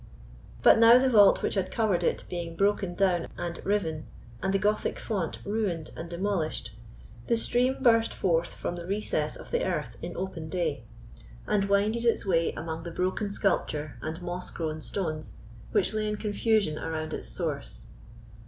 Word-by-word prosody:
But - - +7
now 230 +1 +9
the 260 +1 +3
vault 205 -4 +6
which - - 0
had 190 -2 -1
covered 215 -6 +1
it - - 0
being 170 -2 -5
broken 195 -1 +1
down 180 -3 +2
and 170 0 -5
riven, 165 -7 -1 0.3
and 190 - 0
the 195 - +3
Gothic 210 +2 0
font 195 -8 -2
ruined 200 -7 -2
and 165 - -7
demolished, 170 - -2 0.5
the 235 - +3
stream 250 +3 +2
burst 230 -2 +5
forth 170 -2 0
from 175 - -3
the 170 0 -7
recess 205 +3 -1
of - - -11
the 485 +1 +1
earth - - -2
in - - -6
open 170 -4 -4
day, 155 -8 -2 0.6
and 200 -2 +1
winded 210 +4 +2
its 235 -3 +2
way 165 -3 +2
among 160 0 -5
the 170 - -6
broken 185 +4 -1
sculpture 155 -7 -1
and 160 +3 -5
moss 180 +1 -4
grown 155 -2 -4
stones 155 -4 -3 0.4
which 205 -1 +2
lay 215 0 -1
in 210 - -1
confusion 210 -5 +1
around 155 -1 -3
its - - -5
source. - - -4
190 Hz, 170 wpm, -28 LUFS, 165-210 Hz, 0.6 s, now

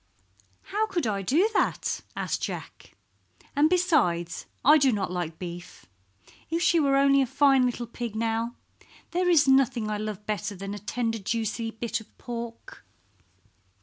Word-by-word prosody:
"How 435 +1 +1
could 350 - -2
I 200 -3 -1
do 305 - +3
that?" - - 0
asked - - -2
Jack. - - -7 0.6
"And 295 +2 +4
besides 235 - +1 0.2
I 300 +3 +8
do 270 -2 +4
not 200 -5 -2
like 175 -3 -3
beef. 175 -1 -8 0.6
If 335 +2 0
she 340 - +4
were 275 -2 +3
only 275 0 +5
a 265 - +1
fine 270 -1 +4
little 245 0 -3
pig, 235 -1 -6
now! 230 +1 -1 0.6
There 360 +1 +1
is 305 -5 +5
nothing 260 -5 +3
I 210 - -2
love 210 -1 -5
better 210 -1 -3
than 195 +2 -6
a 205 - -6
tender 225 +2 -2
juicy 225 +2 -2
bit 230 0 -3
of 220 - -20
pork." 235 -1 -7
235 Hz, 155 wpm, -27 LUFS, 210-280 Hz, 0.6 s, I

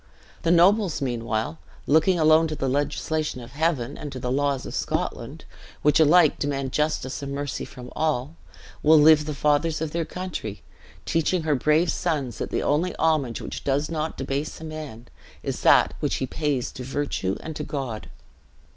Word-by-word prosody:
The 165 - 0
nobles, 180 +1 +4
meanwhile, 120 +2 -2 0.3
looking 160 +5 +4
alone 155 +1 +5
to 155 - -4
the 135 -2 -2
legislation 145 +1 -1
of 120 0 -10
Heaven 145 -3 -1
and 145 - -6
to 130 - -6
the 125 0 -3
laws 140 -1 0
of - - -7
Scotland, - - -3 0.4
which 150 +1 +4
alike 160 0 +5
demand 135 -2 -2
justice 150 -3 -1
and 140 0 -5
mercy 145 -1 -3
from 125 -1 -11
all, 155 -1 -1 0.5
will 155 +1 +6
live 150 0 +6
the 150 -1 -4
fathers 150 +2 +1
of 160 -1 -3
their 170 +1 -1
country, 165 - -6 0.4
teaching 165 +1 +1
her 155 -1 +1
brave 155 +5 +2
sons 145 -8 -2
that - - -3
the - - -1
only 155 +5 +1
homage 150 -7 +1
which - - -6
does 145 +3 0
not 160 0 -3
debase 140 +3 -3
a - - -10
man, 150 -7 -8 0.4
is - - -3
that - - +5
which - - 0
he - - -1
pays 140 -2 -2
to 130 - -8
virtue 130 -8 -2
and 160 - -7
to - - -4
God. 120 - -5
150 Hz, 175 wpm, -25 LUFS, 135-160 Hz, 0.5 s, will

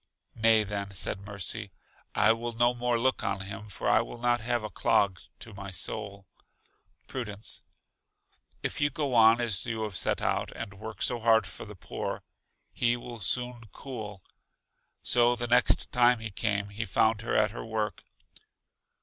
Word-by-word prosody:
Nay 110 -1 +4
then, 100 -1 -4
said 95 +2 -1
Mercy, 100 +1 -1 0.5
I 110 +2 +5
will 120 +1 -4
look - - -14
no 120 0 +4
more 120 0 0 0.3
on 100 -1 -1
him, 100 +2 -7
for - - -4
I - - +5
will 115 - -7
not 120 0 +1
have 120 0 -1
a 110 - -5
clog 100 -4 +2 0.2
to 115 - -9
my 100 0 -7
soul. 100 +1 -4 0.8
Prudence: 110 -4 -4 1.0
If - - -2
you 145 - +4
go 145 -1 -2
on 115 0 +7
as 115 -5 +2
you 110 -2 -2
have 105 -3 -4
set - - +1
out, - - -1
and 100 - -6
work 110 +2 -6
so 120 -2 +1
hard 110 -2 +4
for 95 - -7
the 105 -1 -10
poor, 90 - -5 0.5
he 120 0 +2
will 120 -1 -8
soon 125 +3 +1
cool. 105 -8 -7 0.8
So 120 0 +4
the 120 - -3
next 120 +1 +4
time 125 0 +5
he 110 -2 -6
came, 100 0 0
he 105 +3 -4
found 110 +1 +2
her 115 - -2
at 105 -1 +3
her - - -6
work. 110 -4 -3
110 Hz, 170 wpm, -29 LUFS, 100-120 Hz, 1.0 s, on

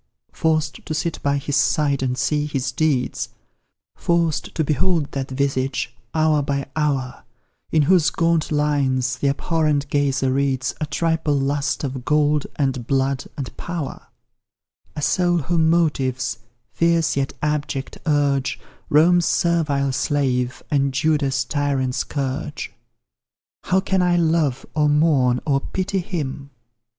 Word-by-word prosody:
Forced 155 -1 0
to 155 - -2
sit 165 +1 -2
by 140 0 +1
his 140 0 -2
side 140 -1 +2
and 125 -1 -1
see 150 +1 0
his 135 -3 -2
deeds; 130 -6 0 0.7
Forced 170 -3 0
to 160 - +1
behold 155 +1 +1
that 135 -1 -4
visage, 130 -2 -1 0.2
hour 155 -1 +3
by 140 -1 -2
hour, 140 -5 -1 0.5
In 155 -2 +4
whose 175 +1 +4
gaunt 165 -2 +1
lines 135 -4 +1
the 140 - +1
abhorrent 150 0 0
gazer 140 -2 +1
reads 130 -2 0
A 155 - -1
triple 160 -1 0
lust 140 +2 -1
of 130 -2 -4
gold, 150 +1 +2
and 130 -4 -1
blood, 135 0 0
and 135 -4 -5
power; 170 -6 -5 0.9
A 150 - -4
soul 175 +1 +2
whom 160 +1 +1
motives 130 -8 0 0.3
fierce, 165 -1 +2
yet 140 0 -1
abject, 145 -2 -2
urge 145 -3 +1 0.3
Rome's 170 +3 +5
servile 150 -5 +1
slave, 130 -3 0
and 140 -2 +1
Judah's 140 -3 +1
tyrant 140 -3 0
scourge. 140 +2 -3 0.9
How 185 - +3
can 190 0 0
I 180 -1 +3
love, 160 -6 +1
or 150 -1 +2
mourn, 145 -5 +3
or 140 -2 +2
pity 190 +4 -2
him? 145 -7 -4
145 Hz, 130 wpm, -22 LUFS, 135-160 Hz, 0.9 s, Rome's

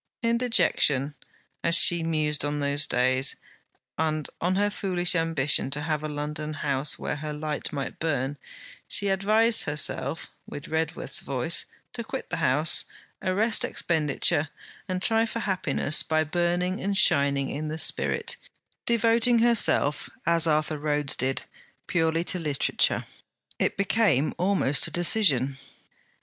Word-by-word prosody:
In 235 0 +1
dejection, 160 - +1 0.5
as 170 - +2
she 170 0 +5
mused 155 -3 0
on 145 0 -2
those 145 0 +1
days, 130 +2 +1 0.6
and 155 -2 -1
on 180 +2 0
her 205 +1 +1
foolish 180 -4 +1
ambition 165 -6 +1
to 145 +2 -1
have 155 -1 -2
a 155 - -3
London 150 +1 -5
house 140 -2 0
where - - -4
her 150 +1 -5
light 150 0 -4
might 140 -3 -5
burn, 145 -3 -2 0.5
she 200 - +1
advised 215 +4 +3
herself, 145 0 -1 0.2
with 145 - -8
Redworth's 160 -3 -2
voice, 135 +4 0 0.3
to 235 - -4
quit 265 +4 -7
the - - -2
house, 145 +5 +2 0.4
arrest 210 +5 +1
expenditure, 155 -1 0 0.4
and 185 -1 -3
try 225 +1 +2
for 230 +1 -4
happiness 170 -7 +1
by 155 0 0
burning 175 +3 -1
and 200 0 0
shining 140 -6 +3
in 155 +2 -4
the 155 +1 -4
spirit: 460 - 0 0.5
devoting 235 +1 +3
herself, 225 -11 +2 0.2
as 170 -1 +3
Arthur 155 -1 0
Rhodes 145 -2 0
did, 130 +1 -1 0.4
purely 165 0 0
to 180 +1 -1
literature. 150 -4 0 0.5
It - - 0
became 195 - +1
almost 180 -7 +2
a - - -8
decision. 145 - +2
155 Hz, 135 wpm, -26 LUFS, 145-185 Hz, 0.6 s, she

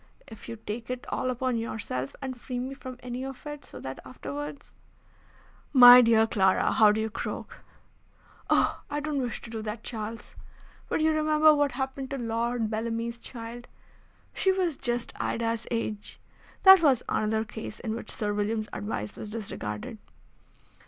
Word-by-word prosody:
If 220 - -11
you 230 - -4
take 225 +1 -6
it 250 0 -4
all 255 - -1
upon 255 -1 -1
yourself 210 - -4
and 260 -1 -4
free 250 - -5
me 255 +2 -3
from 255 -2 -9
any 250 +1 -4
of 270 0 -8
it, 295 -1 -7
so - - -11
that 130 0 -6
afterwards 145 +3 -7 0.5
" - - -30
"My 245 +1 +12
dear 225 -2 +5
Clara, 190 -4 +2
how 215 - +6
you 210 - +5
do 220 +1 -1
croak!" - - -5 0.9
"Oh! - - +3
I 290 +1 -2
don't 295 -2 -2
wish 245 -3 -3
to 235 - -10
do 225 -1 -4
that, 215 +1 -5
Charles. 225 0 -6 0.5
But - - 0
you 315 0 +4
remember 310 0 +5
what 290 -3 +1
happened 265 0 -3
to 275 - -3
Lord 235 -1 -1
Bellamy's 230 +2 -3
child. 235 0 -8 0.7
She 385 - +2
was 365 -5 0
just 240 -2 -2
Ida's 230 -1 -1
age. 220 -3 -3 0.4
That 385 -2 +10
was 275 -7 +4
another 220 +1 0
case 215 0 -7
in 220 -3 -3
which 230 -1 -6
Sir 210 -1 -1
William's 215 +1 -1
advice 105 - -4
was 215 - -7
disregarded." 205 - -5
230 Hz, 165 wpm, -28 LUFS, 220-260 Hz, 0.9 s, My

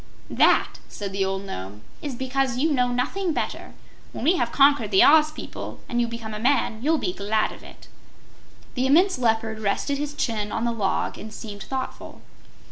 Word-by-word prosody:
"That," - - +3
said 200 -2 -6
the 195 0 0
old 195 +1 -2
Nome, 100 - -7 0.2
"is 285 -4 -4
because 260 0 -1
you 310 +5 +1
know 250 -3 +2
nothing 330 +9 -1
better. - - -4 0.4
When - - -6
we 335 +7 +4
have 235 -1 0
conquered 275 -6 +4
the 190 -2 +6
Oz 305 +1 +6
people, 310 - -8
and 240 -1 0
you 235 - +1
become 230 -2 -6
a 210 - -5
man, 240 -2 +1
you'll 315 +5 +2
be 180 - -2
glad 210 +3 0
of - - -12
it." - - -14 0.9
The 255 0 0
immense 345 +3 +4
Leopard 225 -2 0
rested 220 +7 -1
his 295 0 -4
chin 215 -6 -2
on 225 - -1
the 235 - +1
log 200 -5 -1
and 220 - -8
seemed 210 -2 -8
thoughtful. 265 +3 -6
240 Hz, 190 wpm, -24 LUFS, 215-280 Hz, 0.9 s, the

